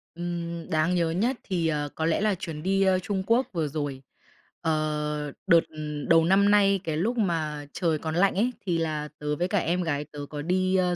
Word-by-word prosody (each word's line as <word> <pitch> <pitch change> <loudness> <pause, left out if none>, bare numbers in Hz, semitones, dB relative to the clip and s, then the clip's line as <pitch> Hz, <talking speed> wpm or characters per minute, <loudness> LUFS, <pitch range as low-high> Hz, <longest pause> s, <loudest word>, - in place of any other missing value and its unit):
Ừm, 170 -1 -4
đáng 160 +3 +2
nhớ 170 -2 +1
nhất 230 +10 +1
thì, 175 -4 -1
ờ, 145 -2 -1
có 160 - -1
lẽ 165 +4 +1
là 210 -2 +2
chuyến 165 -4 -6
đi, 195 +1 +2
ơ, 190 -1 +3
Trung 190 0 -2
Quốc 240 +3 +3
vừa 160 -3 0
rồi. 145 -3 -4 0.6
Ờ, 150 -2 -1 0.2
đợt 170 - +7 0.5
đầu 165 -1 +5
năm 200 +3 +4
nay, 200 -2 +4
cái 155 -3 -2
lúc 230 +9 0
mà 155 -7 -1
trời 165 -4 +1
còn 160 0 -3
lạnh 195 +2 +3
ấy, 245 +5 +1
thì 175 -3 +1
là 155 -2 -2
tớ 150 0 -1
với 175 +4 0
cả 205 - 0
em 180 +1 +1
gái 150 -3 -1
tớ 150 - -9
có 150 -1 -5
đi, 185 +3 +1
ơ, 180 -1 +2
170 Hz, 215 wpm, -26 LUFS, 155-190 Hz, 0.6 s, đợt